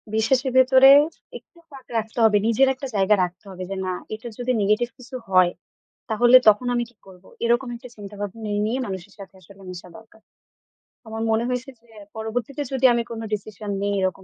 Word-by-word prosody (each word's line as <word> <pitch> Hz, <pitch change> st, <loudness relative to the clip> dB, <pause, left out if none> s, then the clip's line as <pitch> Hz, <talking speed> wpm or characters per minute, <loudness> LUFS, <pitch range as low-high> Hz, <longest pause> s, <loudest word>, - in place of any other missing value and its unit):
বিশ্বাসের 255 Hz, +4 st, +1 dB
ভেতরে 260 Hz, +1 st, +7 dB, 0.5 s
একটু 345 Hz, -, -23 dB
ফাঁক 270 Hz, -3 st, -13 dB
রাখতে 220 Hz, +2 st, -4 dB
হবে, 210 Hz, -2 st, +5 dB
নিজের 250 Hz, +4 st, +3 dB
একটা 270 Hz, +1 st, -7 dB
জায়গা 195 Hz, +1 st, +3 dB
রাখতে 180 Hz, +3 st, -6 dB
হবে 185 Hz, 0 st, -7 dB
যে 195 Hz, -, -4 dB
না, 185 Hz, -, -2 dB, 0.2 s
এটা 220 Hz, +2 st, -10 dB
যদি 245 Hz, +1 st, -1 dB
নেগেটিভ 215 Hz, +4 st, +1 dB
কিছু 255 Hz, +1 st, -11 dB
হয়, 185 Hz, -2 st, +4 dB, 0.6 s
তাহলে 240 Hz, +3 st, +6 dB
তখন 215 Hz, +4 st, +1 dB
আমি 240 Hz, -, 0 dB
কি 240 Hz, -, -27 dB
করব? 185 Hz, -1 st, -16 dB, 0.2 s
এরকম 240 Hz, +2 st, +1 dB
একটা 245 Hz, +1 st, -11 dB
চিন্তাভাবনা 205 Hz, +1 st, -7 dB
নিয়ে, 235 Hz, +5 st, -1 dB
মানুষের 190 Hz, 0 st, -7 dB
সাথে 195 Hz, -1 st, -11 dB
আসলে 195 Hz, +3 st, -17 dB
মিশা 180 Hz, 0 st, -10 dB
দরকার। 220 Hz, 0 st, -19 dB, 0.9 s
আমার 220 Hz, 0 st, -6 dB
মনে 220 Hz, +1 st, +1 dB
হয়েছে 250 Hz, +1 st, -3 dB
যে, 235 Hz, -, -29 dB, 0.3 s
পরবর্তীতে 240 Hz, +6 st, -4 dB
যদি 265 Hz, 0 st, +1 dB
আমি 235 Hz, 0 st, 0 dB
কোন 230 Hz, -, -5 dB
ডিসিশন 210 Hz, 0 st, -5 dB
নিই 205 Hz, 0 st, -1 dB
এরকম 190 Hz, 0 st, -2 dB
220 Hz, 180 wpm, -23 LUFS, 200-245 Hz, 0.9 s, ভেতরে